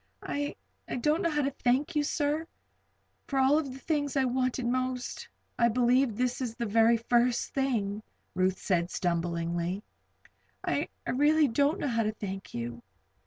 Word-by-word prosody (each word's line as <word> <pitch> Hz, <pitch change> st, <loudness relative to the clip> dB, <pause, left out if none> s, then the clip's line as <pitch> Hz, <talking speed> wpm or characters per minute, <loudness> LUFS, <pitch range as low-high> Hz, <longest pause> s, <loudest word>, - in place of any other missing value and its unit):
"I 290 Hz, 0 st, -2 dB, 0.4 s
don't 305 Hz, +7 st, +2 dB
know 335 Hz, -, +2 dB
how 295 Hz, -2 st, 0 dB
to 275 Hz, -, 0 dB
thank 265 Hz, +3 st, 0 dB
you, 295 Hz, -, +3 dB
sir; 300 Hz, +2 st, 0 dB, 0.8 s
for 275 Hz, -, -2 dB
of 265 Hz, -, +5 dB
all 295 Hz, +4 st, +4 dB
the 265 Hz, -3 st, -7 dB
things 290 Hz, -1 st, -1 dB
I 265 Hz, -, +3 dB
wanted 255 Hz, 0 st, 0 dB
most, 255 Hz, +1 st, -2 dB, 0.3 s
I 235 Hz, -, +5 dB
believe 245 Hz, 0 st, +3 dB
this 250 Hz, +1 st, 0 dB
is 235 Hz, -3 st, -3 dB
the 235 Hz, -, -2 dB
very 225 Hz, +2 st, +4 dB
first 240 Hz, +1 st, +1 dB
thing," 220 Hz, -7 st, 0 dB, 0.3 s
Ruth 185 Hz, +1 st, +1 dB
said, 175 Hz, -3 st, 0 dB
stumblingly. 170 Hz, +2 st, -1 dB, 0.8 s
"I -, -, 0 dB, 0.2 s
really 295 Hz, +3 st, +4 dB
don't 280 Hz, +6 st, +2 dB
know -, -, -2 dB
how 230 Hz, -3 st, +1 dB
to 215 Hz, -1 st, 0 dB
thank 195 Hz, -2 st, -6 dB
you." 120 Hz, 0 st, -5 dB
250 Hz, 160 wpm, -29 LUFS, 210-280 Hz, 0.8 s, of